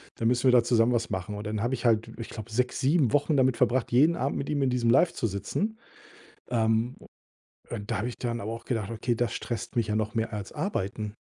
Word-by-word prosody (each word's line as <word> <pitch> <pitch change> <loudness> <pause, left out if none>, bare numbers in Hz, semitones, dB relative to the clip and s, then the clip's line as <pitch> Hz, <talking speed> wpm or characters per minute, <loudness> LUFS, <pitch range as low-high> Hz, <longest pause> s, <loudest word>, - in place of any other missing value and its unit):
dann 115 - 0
müssen 125 +2 +1
wir 130 - +7
da 125 -2 +6
zusammen 120 0 +3
was 115 -1 0
machen.“ 95 +1 -3
Und 105 - -6
dann 105 0 -2
habe 120 +3 0
ich 125 -1 -3
halt, 115 -1 +3
ich 115 - -6
glaube, 110 0 -8
6, 125 +3 0
7 140 -3 +3
Wochen 145 +1 +2
damit 130 -2 +3
verbracht, 125 +1 +1
jeden 150 +8 +5
Abend 135 0 -1
mit 140 - -4
ihm 145 -2 0
in 135 - +2
diesem 125 -2 +1
Live 165 +8 +4
zu 115 - -1
sitzen. 195 - -2 0.7
Ähm, 115 +1 +1
u - - -15 0.7
und 105 -3 -5
da - - 0
habe 115 - -1
ich 125 - -8
dann 120 -1 -2
aber 110 +3 -4
auch 115 - -7
gedacht: 110 -5 -2
„Okay, 115 +2 -1
das 120 0 -1
stresst 120 - -4
mich 115 -3 +1
ja 105 - 0
noch 110 0 -1
mehr 115 0 -1
als 105 -3 -5
arbeiten.“ 105 - -3
120 Hz, 250 wpm, -27 LUFS, 110-130 Hz, 0.7 s, wir